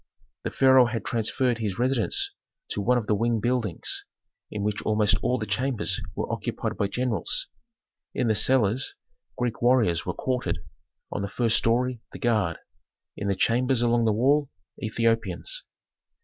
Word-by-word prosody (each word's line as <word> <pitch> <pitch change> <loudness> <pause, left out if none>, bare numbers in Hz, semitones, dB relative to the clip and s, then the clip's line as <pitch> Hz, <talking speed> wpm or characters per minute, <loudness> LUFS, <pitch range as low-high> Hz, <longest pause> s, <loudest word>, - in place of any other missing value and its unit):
The - - -1
pharaoh 130 -2 +6
had 115 -1 -3
transferred 120 +1 0
his 105 -4 -2
residence 125 -1 0 0.4
to 105 - -2
one 125 +5 +3
of 115 - -1
the 105 - +1
wing 115 +2 +1
buildings, 115 -5 -1 0.5
in 105 - -4
which 105 0 -1
almost 105 -1 +3
all 125 - +1
the 110 - -3
chambers 125 -2 -1
were - - -2
occupied - - -3
by 100 - 0
generals. 125 - -1 0.7
In 125 - +1
the 110 - +4
cellars 125 +1 +2 0.4
Greek 120 -2 -2
warriors 115 -9 +3
were - - -3
quartered, 130 -1 -1 0.5
on - - -2
the 100 - -2
first 115 +2 +1
story 120 +1 +1
the - - -6
guard, 105 -8 +1 0.6
in 100 - -4
the 100 - +1
chambers 120 +4 +2
along 120 -1 +3
the 110 - +4
wall, 135 +6 +3 0.3
Ethiopians. 115 - -1
115 Hz, 155 wpm, -26 LUFS, 105-125 Hz, 0.7 s, pharaoh